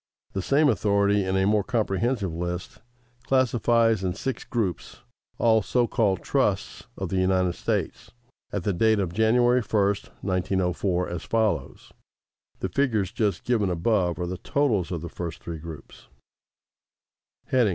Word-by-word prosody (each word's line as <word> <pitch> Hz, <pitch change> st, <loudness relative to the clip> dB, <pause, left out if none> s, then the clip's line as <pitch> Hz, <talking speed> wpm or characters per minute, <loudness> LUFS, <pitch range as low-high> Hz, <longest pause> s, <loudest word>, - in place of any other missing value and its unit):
The 95 Hz, -, -1 dB
same 145 Hz, +9 st, +3 dB
authority, 100 Hz, -3 st, +2 dB
in 95 Hz, 0 st, 0 dB
a 95 Hz, -, +2 dB
more 105 Hz, 0 st, +3 dB
comprehensive 110 Hz, -3 st, -1 dB
list, 90 Hz, +1 st, -5 dB, 0.5 s
classifies 115 Hz, -4 st, +2 dB
in 90 Hz, -1 st, -1 dB
six 130 Hz, +5 st, -4 dB
groups 105 Hz, -9 st, -3 dB, 0.4 s
all 110 Hz, -1 st, +4 dB
so 120 Hz, +5 st, +1 dB
called 100 Hz, -7 st, 0 dB
"trusts" -, -, -1 dB
of -, -, -3 dB
the 95 Hz, -, 0 dB
United 95 Hz, -1 st, +2 dB
States, -, -, -3 dB, 0.4 s
at 100 Hz, -, -3 dB
the 100 Hz, -, 0 dB
date 110 Hz, +5 st, +3 dB
of 90 Hz, -4 st, -2 dB
January 120 Hz, +4 st, +3 dB
1, 105 Hz, -2 st, +1 dB, 0.4 s
1904, 90 Hz, -1 st, 0 dB
as 85 Hz, -2 st, -5 dB
follows 110 Hz, +1 st, -1 dB, 0.7 s
(the 95 Hz, -, -1 dB
figures 105 Hz, -3 st, 0 dB
just 105 Hz, -5 st, -1 dB
given 110 Hz, -6 st, +1 dB
above 90 Hz, -1 st, +1 dB
are 90 Hz, -, -2 dB
the 90 Hz, +1 st, -5 dB
totals 110 Hz, -12 st, 0 dB
of 85 Hz, -3 st, -3 dB
the 85 Hz, -, -5 dB
first 85 Hz, -1 st, -6 dB
three 85 Hz, -2 st, -6 dB
groups): 80 Hz, -3 st, -11 dB, 1.5 s
No. 125 Hz, -5 st, +4 dB
100 Hz, 145 wpm, -25 LUFS, 90-115 Hz, 1.5 s, all